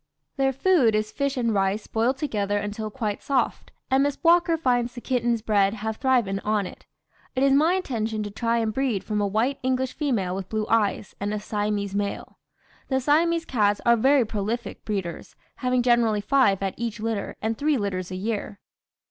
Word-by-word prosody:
"Their 270 -1 +2
food 270 - +3
is 215 0 -1
fish 280 -1 -2
and 230 -3 +1
rice 195 +1 0
boiled 235 +4 0
together 205 -8 -1
until 210 +1 -4
quite 215 -3 -3
soft, 275 -2 -1 0.2
and 265 +1 +4
Miss 285 0 0
Walker 335 0 +4
finds 245 -4 0
the - - -5
kittens 240 -2 0
bred 200 -2 +2
have 220 0 -4
thriven 240 -7 +1
on 210 -1 0
it. - - -11 0.5
"It 260 - +1
is 275 0 +4
my 315 +6 +4
intention 225 - -2
to 205 - -6
try 230 +3 0
and 225 -2 0
breed 250 -6 0
from 210 -1 -1
a 205 - +1
white 225 +7 0
English 260 0 0
female 230 - -1
with 190 0 -5
blue 215 -1 -1
eyes, 210 -2 +1
and 205 +1 -2
a - - -2
Siamese 205 -1 -2
male. 200 0 -4 0.5
"The 265 -1 +1
Siamese 330 +5 +2
cats 205 -4 +1
are 235 0 +6
very 265 +2 +4
prolific 220 +3 -4
breeders, 190 -5 -4 0.2
having 250 -1 +1
generally 235 -4 +3
five 205 -4 +3
at 190 -1 -1
each 230 -2 -4
litter, 220 -2 -3
and 220 +1 -1
three 290 +3 +1
litters 185 -4 -3
a 185 - -5
year. 205 +1 -3
225 Hz, 190 wpm, -25 LUFS, 205-260 Hz, 0.5 s, are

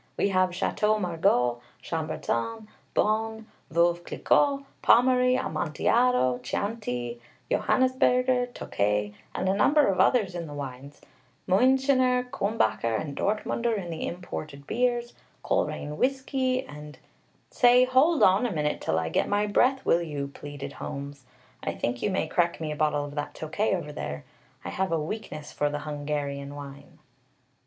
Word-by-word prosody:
"We 200 - +2
have 185 -1 +3
Château 210 +4 0
Margaux, 160 - +1 0.2
Chambertin, 165 - -3 0.3
Beaune, 220 +1 0 0.3
Veuve 170 +1 +3
Clicquot, 280 +8 +2 0.2
Pommery, 250 +1 +5
Amontillado, 155 - +1
Chianti, 125 - -3 0.3
Johannisberger, 255 -1 +2
Tokay, 105 - -1 0.2
and - - -1
a 190 - +3
number 285 +9 +4
of 195 - 0
others 210 -8 +3
in 170 -2 -5
the 145 - -8
wines; 140 0 -8 0.5
Muenchener, 255 +4 +3
Culmbacher, 115 - 0
and 145 -3 -5
Dortmunder 220 +2 0
in 175 -4 -5
the 160 - -4
imported 155 -5 -7
beers; 240 - 0 0.3
Coleraine 150 +1 -1
whiskey, 260 - 0
and 150 - -10 0.3
" - - -38
"Say, 245 0 +6
hold 270 +5 +4
on 195 +6 +5
a - - -4
minute, 150 -4 -1
till 80 - 0
I 80 0 -1
get - - 0
my 205 +1 +2
breath, 255 +6 +2
will 170 - +3
you?" 145 -4 -4
pleaded 140 0 -8
Holmes. 140 -1 -7 0.4
"I - - -3
think 120 0 -2
you - - +1
may 190 - 0
crack 170 -1 0
me 155 -2 -3
a - - -3
bottle 150 -1 +1
of 145 - -9
that 145 0 -4
Tokay 190 +7 -1
over 165 -5 -5
there. 75 - -5 0.4
I - - -3
have 190 -1 -2
a 165 - +1
weakness 155 -3 -6
for 145 - 0
the 145 0 -4
Hungarian 145 -1 -4
wine." 140 0 -10
175 Hz, 150 wpm, -27 LUFS, 145-240 Hz, 0.5 s, Say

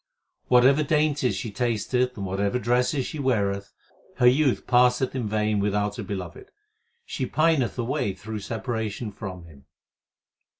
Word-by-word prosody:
Whatever 130 +4 +5
dainties 150 -3 +1
she 115 - -4
tasteth 125 +3 -1
and 100 - -4
whatever 100 +4 -1
dresses 125 +3 +1
she 155 - -6
weareth, 100 -7 0 0.4
Her 125 - +2
youth 130 +1 +3
passeth 125 +1 +3
in 125 -4 -2
vain 105 0 0
without 105 0 0
her 115 - -4
Beloved; 100 - -7 0.6
she 130 - -3
pineth 155 -5 +1
away 120 -4 -1
through 110 +2 -6
separation 110 0 -4
from 95 -4 -8
Him. 70 -5 -17
120 Hz, 135 wpm, -25 LUFS, 105-130 Hz, 0.6 s, Whatever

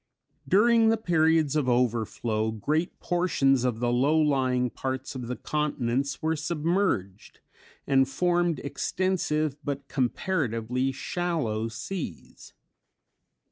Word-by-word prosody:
During 225 +3 +5
the 225 - +3
periods 160 -6 +2
of 145 -4 +1
overflow, 115 -2 0
great 150 - -2
portions 140 -8 +2
of 120 -3 0
the 120 0 +1
low 140 +6 +3
lying 130 -4 +1
parts 130 +1 -4
of 125 -3 -6
the 125 - -3
continents 140 -2 -2
were 160 +1 +1
submerged, 155 - -1 0.5
and 135 -1 +3
formed 175 +2 +1
extensive 155 -2 -1
but 140 -1 -4
comparatively 130 - -1
shallow 135 -8 -2
seas. 150 - -7
140 Hz, 105 wpm, -27 LUFS, 125-165 Hz, 0.5 s, During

